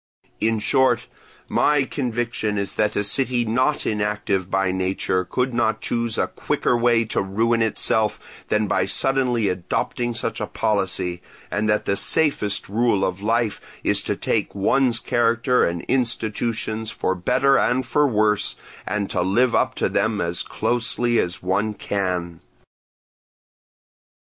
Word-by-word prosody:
In 115 +1 +1
short, 125 +2 +2 0.4
my 150 -2 +3
conviction 120 -5 -2
is 100 -1 -2
that 105 0 0
a 105 - +1
city 120 +3 +1
not 130 +7 +1
inactive 105 -3 -1
by 95 -1 +1
nature 95 0 -1
could 125 +7 -1
not 110 -2 +1
choose 115 -1 -1
a - - +2
quicker - - -1
way 120 -1 +3
to 110 - -1
ruin 115 +4 +1
itself 110 -1 0
than 105 0 +1
by - - 0
suddenly 125 -5 +1
adopting 100 +6 -2
such 115 - -3
a - - -2
policy, 95 -4 -1 0.3
and 105 +1 0
that 105 - +1
the 100 - +1
safest 125 -5 0
rule 105 -1 +1
of 95 +1 -3
life 115 0 0 0.2
is - - +2
to - - -2
take - - -1
one's 120 +4 +2
character 120 +1 +2
and 85 0 -1
institutions 110 -2 -1
for 95 - -1
better 125 +9 +2
and 130 +1 +1
for 145 +4 +2
worse, 105 -4 +1 0.3
and 100 +1 -1
to - - 0
live 115 +7 +2
up - - +1
to - - 0
them 110 -2 0
as 85 0 -1
closely 120 0 0
as 90 0 -2
one 100 +4 0
can." 90 -5 -3
110 Hz, 145 wpm, -22 LUFS, 100-120 Hz, 0.4 s, my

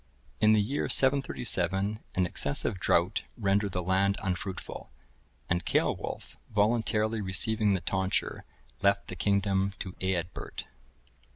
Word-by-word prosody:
(1063) 105 - +4
In - - +7
the 110 - +4 0.2
year - - -1
737, 105 -7 +2 0.2
an 90 - +2
excessive 90 +3 0
drought 90 +3 +2 0.2
rendered 100 -2 +1
the 90 - -1
land 95 +2 +2
unfruitful; 95 0 -4 0.6
and 85 0 0
Ceolwulf, - - -2
voluntarily 110 0 +1
receiving 105 +2 +2
the 95 - -2
tonsure, 95 0 -1 0.4
left 100 0 +2
the 90 - -5
kingdom 100 0 +1
to 90 - -6
Eadbert. 90 -2 -3
100 Hz, 120 wpm, -29 LUFS, 95-105 Hz, 0.6 s, In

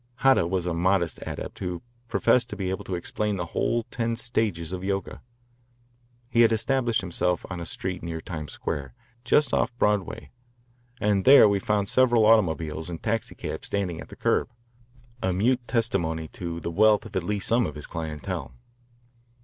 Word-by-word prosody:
Hata 135 -10 +4
was 90 -1 -1
a 90 - -1
modest 85 0 +1
adept - - -6
who 90 -2 -4 0.2
professed 120 +1 +2
to 105 - -5
be 95 -2 -2
able 95 - -4
to 95 - -3
explain 105 +4 -2
the 90 - -2
whole 115 +6 0
ten 115 -1 -1
stages 105 -8 -2
of 90 0 -4
Yoga. 100 0 -3 1.1
He 120 -1 +3
had 115 - +6
established 120 +1 +1
himself 90 -1 -1
on 90 - -4
a 85 - -6
street 95 0 -4
near 85 -1 -4
Times 75 -4 -6
Square, 70 -4 -4 0.3
just 130 +2 +3
off 120 +1 +1
Broadway, 105 -4 0 0.7
and 100 -4 +2
there 135 -4 +9
we 100 -1 +2
found 100 0 0
several 120 -2 +4
automobiles 80 -7 +2
and 85 -2 -7
taxicabs 115 0 -3
standing 95 -5 -2
at - - -11
the - - -10
curb, - - +1 0.7
a 95 - +1
mute 120 +8 +2
testimony 85 -9 0
to 85 -2 -5
the 85 - -4
wealth 105 +4 +4
of 110 -2 -11
at 95 - +1
least 100 +2 -2
some 115 +1 +3
of 75 - -7
his 75 - -7
clientele. 75 -6 -5
95 Hz, 175 wpm, -26 LUFS, 85-115 Hz, 1.1 s, there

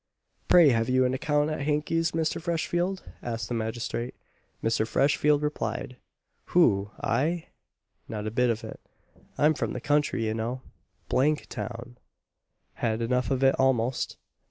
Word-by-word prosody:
"Pray, 170 -4 +7
have 115 -1 +1
you 130 0 +4
an 125 - +1
account 150 +2 +1
at 155 - -3
Hankey's, 155 +3 0
Mr. 160 0 -1
Freshfield?" 175 +2 -1 0.2
asked 115 -4 -4
the - - -2
magistrate. 115 +1 -3 0.5
Mr. 110 -1 +1
Freshfield 145 +3 +2
replied, 150 -3 -3 0.5
"Who, 105 - +3
I? 160 +8 0 0.6
not 105 -1 -4
a 110 - -2
bit 125 +2 +2
of 110 -1 -1
it. - - -8 0.6
I'm 150 +2 +4
from - - -2
the - - -3
country, 145 -5 +1
you 110 - 0
know. 115 +3 -3 0.5
D - - 0
n 150 +3 +4
town! 120 -1 -7 0.7
Had 110 -1 -1
enough 125 +2 0
of 135 -1 0
it 135 0 +6
almost. 130 -2 +1
130 Hz, 150 wpm, -27 LUFS, 115-150 Hz, 0.7 s, Pray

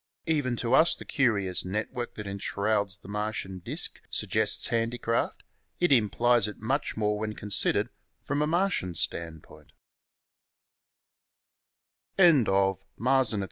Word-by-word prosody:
Even 145 -6 0
to 120 +1 -1
us 160 +5 +5
the - - -11
curious 105 - +1
network 110 +6 -4
that 105 - -6
en 100 0 -5
shrouds 100 -1 0
the - - -16
Martian 105 -2 -3
disk 85 - -4
suggests - - 0
handicraft; 115 0 -1 0.4
it 175 -4 +2
implies 120 -1 +3
it 105 - -7
much 135 +5 -2
more 105 -1 0
when 110 0 -3
considered 105 +1 +1 0.4
from 145 +1 -1
a 150 - +1
Martian 170 - 0
standpoint. 80 -1 -4
110 Hz, 110 wpm, -28 LUFS, 100-125 Hz, 0.4 s, us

